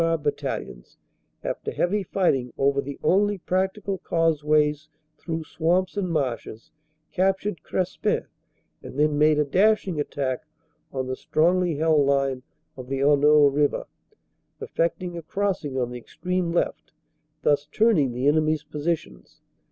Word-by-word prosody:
R. 165 0 +2
Battalions, 145 - -4 0.5
after - - -3
heavy 205 +4 0
fighting 155 -10 0
over 140 0 +2
the 140 0 -7
only 205 +2 +3
practical 190 +2 -2
causeways 155 -3 +1 0.3
through 160 -1 -4
swamps 175 +5 0
and 195 -3 -1
marshes, 125 -7 -3 0.4
captured 195 0 0
Crespin 185 0 -1 0.6
and - - -10
then 150 0 +2
made 150 0 +5
a 150 - +2
dash 200 +8 +3
ing 170 -5 -3
attack 135 -3 -2 0.5
on 130 -1 -3
the 130 0 -3
strongly 175 +4 +1
held 155 -1 +3
line 135 -2 +1 0.3
of 130 -2 -9
the 135 0 -2
Honneau 145 +1 +5
river, 145 0 +1 0.7
effecting 170 +1 -2
a - - -8
crossing 170 -6 -2
on 125 -1 -1
the 125 - -6
extreme 180 +7 -3
left, 170 - -2 0.5
thus 145 0 +2
turning 160 - +3
the 125 +3 -1
enemy 155 +1 +3
s 155 -1 -4
positions. 155 0 -5
155 Hz, 135 wpm, -25 LUFS, 140-180 Hz, 0.7 s, made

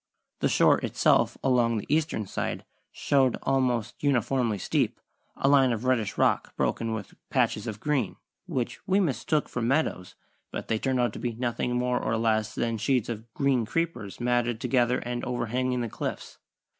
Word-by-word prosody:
The - - +2
shore - - +4
itself - - +2
along 120 -3 +3
the 105 - -4
eastern 150 -7 0
side - - -3 0.3
showed 135 -3 +2
almost 125 -5 0
uniformly 125 -4 +1
steep - - 0 0.4
a - - +1
line 135 -2 +5
of 115 +1 -3
reddish 120 -6 +1
rock - - +1
broken 115 -1 -1
with 105 -3 -7 0.2
patches - - +1
of 110 -1 -5
green, 135 -8 0 0.3
which 125 -2 -2
we 195 +1 +3
mistook 155 -3 0
for 125 - -4
meadows 115 - 0 0.3
(but - - -6
they 110 - +1
turned 130 0 0
out 120 -1 +1
to - - -7
be 120 -1 -2
nothing 120 +1 -2
more 125 0 +1
or 115 - 0
less 110 -1 +1
than 115 -1 -1
sheets 125 +1 +1
of 115 0 -6
green 135 -4 +2
creepers 160 - -3
matted 120 -1 +1
together 125 0 +2
and 120 0 -4
overhanging 125 +1 -1
the 120 - -1
cliffs). - - -5
125 Hz, 170 wpm, -27 LUFS, 115-130 Hz, 0.4 s, line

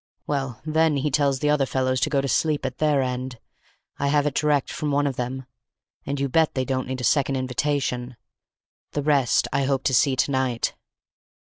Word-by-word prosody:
Well, 135 -4 -3
then, 160 -1 +2
he 145 +2 -1
tells 140 -1 +1
the 150 0 +2
other 140 -3 +2
fellows 130 0 0
to 150 - +1
go 140 -2 +1
to 140 - -2
sleep 150 +2 +1
at 130 -1 -4
their 150 -3 +2
end—I 125 +2 -7
have 145 0 +2
it 150 - 0
direct 150 -2 +1
from 150 - -3
one 145 0 +1
of 140 -2 -1
them—and 130 +2 -7
you 140 - 0
bet 160 +4 +2
they 130 -1 0
don't 130 -1 -2
need 130 0 -4
a - - -5
second 140 0 +2
invitation. 130 -1 -2 0.8
The 145 - -1
rest 140 -4 +2
I 140 - +1
hope 135 -1 0
to 130 - +1
see 130 +2 +3
to 135 - +1
night." 130 -3 0
135 Hz, 195 wpm, -24 LUFS, 130-145 Hz, 0.8 s, see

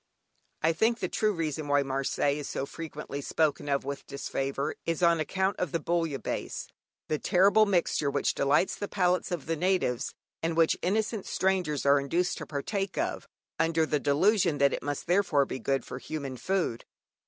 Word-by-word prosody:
I 165 +1 +4
think 225 +7 +2
the - - -2
true 215 -1 +1
reason 155 -4 -3
why 145 0 +3
Marseilles 135 +2 0
is 145 - -5
so 135 - -2
frequently 150 -2 -6
spoken 145 0 0
of 140 -1 +1
with 140 0 -5
disfavour 140 +1 -2
is 165 +1 -1
on 170 -1 +5
account 190 +5 0
of 180 -5 -1
the 170 - 0
"Bouillabaisse," 165 -3 -2 0.4
the 155 - -1
terrible 200 +4 +4
mixture 170 -6 +1
which - - 0
delights 145 +6 +2
the 205 - -4
palates 180 -2 +1
of 175 -5 -3
the 165 - -1
natives, 180 -8 0 0.3
and 165 0 -1
which 165 -1 +4
innocent 215 +2 -1
strangers 180 -7 0
are 140 0 +6
induced 170 +6 0
to - - -7
partake 195 +7 -3
of 340 +3 -2 0.3
under 165 -1 +2
the 150 -1 0
delusion 170 - +3
that 140 -1 +3
it - - -2
must 145 -1 -3
therefore 175 -6 +3
be 130 - -5
good 135 +3 -1
for 125 - -6
human 140 -3 -5
food. 170 -3 -1
160 Hz, 175 wpm, -29 LUFS, 140-185 Hz, 0.4 s, are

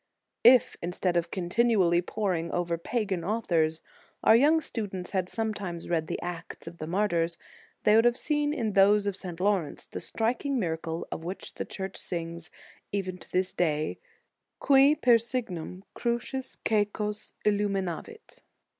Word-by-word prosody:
If, 245 +1 +6
instead 175 +1 -1
of 170 0 +1
continu 220 +7 +1
ally 170 0 +3
poring 180 -4 -2
over 175 -1 0
pagan 195 0 -2
authors, 165 -6 0 0.4
our 220 - +7
young 295 +7 +5
students 200 - -5
had 185 -2 -1
sometimes 205 -7 -4
read 160 -2 0
the - - -3
acts 175 -1 -6
of 170 +1 -9
the 155 - -5
martyrs, 170 -2 +1 0.5
they 210 - +5
would 225 +1 +5
have 240 0 +4
seen 295 0 0
in 230 -8 -1
those 200 +1 +5
of 200 -2 -1
St. 180 -3 -7
Laurence 190 -6 0
the - - -7
striking 250 +5 -1
miracle 165 -4 -2
of 160 - -5
which 180 +3 -6
the - - -4
Church 190 -1 -6
sings 170 -1 -5 0.4
even 185 -2 -3
to - - -15
this 185 0 0
day, 155 -3 0 0.6
qui 275 +1 +6
per 245 -6 +5
signum 200 -7 -4
crucis 245 +2 -3
c&cos 210 0 -1
illuminavit. 205 - -2
195 Hz, 150 wpm, -28 LUFS, 170-225 Hz, 0.6 s, our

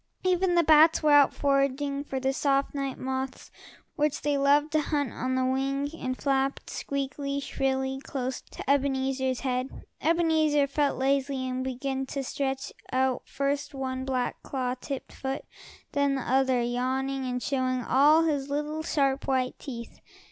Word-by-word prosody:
Even 365 -1 +2
the 340 - +5
bats 315 +1 +6
were 305 - +4
out 290 -2 +7
foraging, 280 0 0
for 270 -2 -4
the 265 +1 0
soft 275 0 +1
night 275 -2 -3
moths 260 0 -4 0.4
which 300 -1 0
they 290 -1 +1
loved 285 +2 +3
to 310 0 +2
hunt 290 -5 -1
on 260 +1 -2
the 260 0 +1
wing, 275 +2 0
and 255 -5 -4
flapped, 275 -1 0
squeaking 280 0 -3
shrilly, 265 -1 -1
close 260 -1 -3
to - - -10
Ebenezer's 265 -2 +1
head. 255 0 -3 0.2
Ebenezer 315 -3 +3
felt 280 +1 0
lazy, 270 0 0
and 255 0 -2
began 265 +1 -3
to 275 0 -3
stretch 270 +1 -3 0.2
out 260 -1 +1
first 280 +1 -2
one 260 -1 -3
black, 255 -2 -2
claw 255 -2 -2
tipped 265 +1 -6
foot, 270 0 -4 0.5
then 280 -1 +1
the 265 - -2
other, 260 -1 +2
yawning 260 +3 -1
and 250 0 -3
showing 255 -2 0
all 295 +7 +5
his 285 -4 0
little 300 +2 -2
sharp 275 -3 0
white 260 -1 0
teeth. 235 -4 -8
275 Hz, 155 wpm, -28 LUFS, 260-285 Hz, 0.5 s, out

